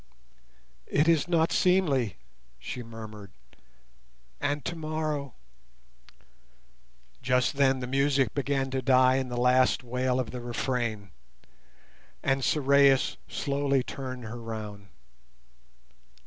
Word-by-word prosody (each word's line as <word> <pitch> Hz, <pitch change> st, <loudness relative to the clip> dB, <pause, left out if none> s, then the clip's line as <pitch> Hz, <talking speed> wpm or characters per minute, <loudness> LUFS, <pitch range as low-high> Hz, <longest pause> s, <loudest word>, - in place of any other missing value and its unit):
"It 150 Hz, +3 st, +2 dB
is 165 Hz, -2 st, +3 dB
not 165 Hz, -2 st, +2 dB
seemly," 150 Hz, -, +2 dB, 0.4 s
she 60 Hz, -, -6 dB
murmured, 110 Hz, -3 st, -10 dB, 1.1 s
"and 145 Hz, 0 st, -2 dB
tomorrow—" 155 Hz, -4 st, -3 dB, 1.9 s
Just 125 Hz, +1 st, +1 dB
then 135 Hz, -2 st, +3 dB
the -, -, -3 dB
music 135 Hz, +1 st, +1 dB
began 135 Hz, -1 st, -1 dB
to 130 Hz, 0 st, -1 dB
die 130 Hz, 0 st, +4 dB
in 130 Hz, -1 st, -2 dB
the 120 Hz, -, -4 dB
last 125 Hz, +1 st, +3 dB
wail 125 Hz, +1 st, -1 dB
of 125 Hz, -, -3 dB
the 125 Hz, -, -6 dB
refrain, 120 Hz, -5 st, -3 dB, 1.1 s
and 135 Hz, 0 st, +1 dB
Sorais 140 Hz, -2 st, +3 dB
slowly 140 Hz, -2 st, 0 dB
turned 130 Hz, -2 st, -6 dB
her 115 Hz, +2 st, -7 dB
round. 105 Hz, -3 st, -7 dB
130 Hz, 105 wpm, -28 LUFS, 120-140 Hz, 1.9 s, die